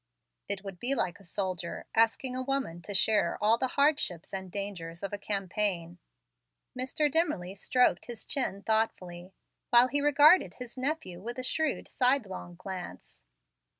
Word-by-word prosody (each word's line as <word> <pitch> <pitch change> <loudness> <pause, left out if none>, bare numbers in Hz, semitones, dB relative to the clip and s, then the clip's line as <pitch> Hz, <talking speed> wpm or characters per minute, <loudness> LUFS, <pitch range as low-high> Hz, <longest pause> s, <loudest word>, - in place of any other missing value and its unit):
It 200 -1 -2
would 195 -3 -8
be 260 +6 +2
like 180 -7 -1
a - - -17
soldier 185 -1 -4
asking 230 +3 +2
a 255 - -2
woman 260 -11 -2
to 205 - -7
share 210 +3 +3
all 220 +2 +3
the 260 - +1
hardships 280 - +1
and 190 -1 -4
dangers 175 -4 -5
of 200 - -3
a 205 - -3
campaign." 195 -4 -1 0.8
Mr. 260 +4 0
Dimmerly 290 - 0
stroked 250 +5 +2
his 240 -2 -8
chin 240 -8 -3
thoughtfully, 190 -4 -1 0.3
while 240 +1 +7
he 285 +1 +1
regarded 295 +5 +5
his 250 -2 -9
nephew 255 - -3
with 240 +4 -6
a 255 - -3
shrewd, 310 +3 -1
sidelong 245 -9 0
glance. 180 - -8
210 Hz, 150 wpm, -29 LUFS, 185-260 Hz, 0.8 s, while